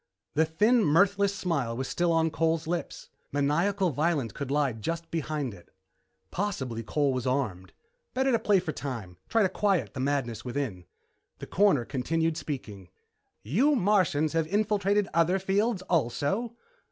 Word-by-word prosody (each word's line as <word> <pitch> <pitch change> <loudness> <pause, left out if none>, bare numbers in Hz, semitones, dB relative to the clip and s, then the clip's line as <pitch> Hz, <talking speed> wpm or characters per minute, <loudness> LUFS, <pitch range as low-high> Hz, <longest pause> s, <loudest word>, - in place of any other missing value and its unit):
The 160 +2 +3
thin, 215 +9 +3
mirthless 200 +5 +3
smile 140 -12 -1
was 130 +1 -3
still 175 -1 0
on 165 -1 +2
Cole's 165 0 0
lips. 170 +1 -4 0.2
Maniacal 170 +7 +1
violence 145 -4 0
could 140 +5 -6
lie 140 -2 +1
just 165 +10 -4
behind 150 -6 -2
it. 90 -3 -15 0.6
Possibly 135 - -2
Cole 140 +4 0
was 130 -1 -2
armed. 115 -9 -2 0.4
Better 265 +1 +2
to 230 - +3
play 205 -3 +3
for 165 - -3
time 120 - -6
try 225 -1 +3
to 190 - +2
quiet 180 - 0
the - - -6
madness 130 -4 -1
within. 120 -9 -4 0.5
The - - -7
Coroner 190 -11 +3
continued 160 +5 -1
speaking. 105 - -6 0.5
"You 245 - +3
Martians 180 - +2
have 165 -1 +1
infiltrated 205 0 +1
other 170 +3 +3
fields 195 +2 0
also?" 185 - 0
160 Hz, 150 wpm, -28 LUFS, 130-195 Hz, 0.6 s, The